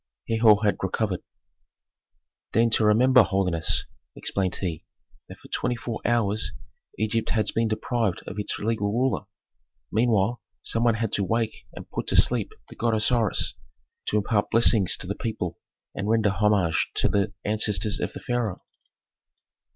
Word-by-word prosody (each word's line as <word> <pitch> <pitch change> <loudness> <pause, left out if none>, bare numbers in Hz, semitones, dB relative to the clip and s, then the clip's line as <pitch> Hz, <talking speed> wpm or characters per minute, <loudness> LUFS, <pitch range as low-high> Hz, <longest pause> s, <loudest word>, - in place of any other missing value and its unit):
Herhor 110 -2 +4
had 105 - +2
recovered. 95 0 -1 1.3
"Deign 115 +1 +3
to 110 - +4
remember, 125 +5 +5
holiness," 90 -5 +1 0.3
explained 95 -2 -1
he, 85 -5 -4 0.5
"that - - -10
for - - -16
twenty 125 - -1
four 120 -1 -5
hours 110 -3 +1 0.4
Egypt 110 +2 -1
has 110 -2 +1
been 115 0 +1
deprived 110 -2 -1
of 105 - -6
its 105 - -1
legal 105 -1 -1
ruler. 125 0 0 0.7
Meanwhile 110 0 +1 0.2
some 115 - 0
one 120 -2 +3
had 110 -1 -2
to 100 - +1
wake 110 +3 -2
and - - -9
put - - -4
to - - 0
sleep - - +3 0.2
the - - -12
god 115 -1 0
Osiris, 110 0 +1 0.5
to 105 - +1
impart 105 0 0
blessings 110 -4 +4
to - - -7
the 95 - -2
people 105 -7 -4 0.3
and 100 +1 -3
render 110 -2 +3
homage 95 -4 +1
to - - +2
the 100 0 0
ancestors 105 0 0
of - - -3
the - - -8
pharaoh. 120 -6 -2
110 Hz, 150 wpm, -25 LUFS, 100-115 Hz, 1.3 s, remember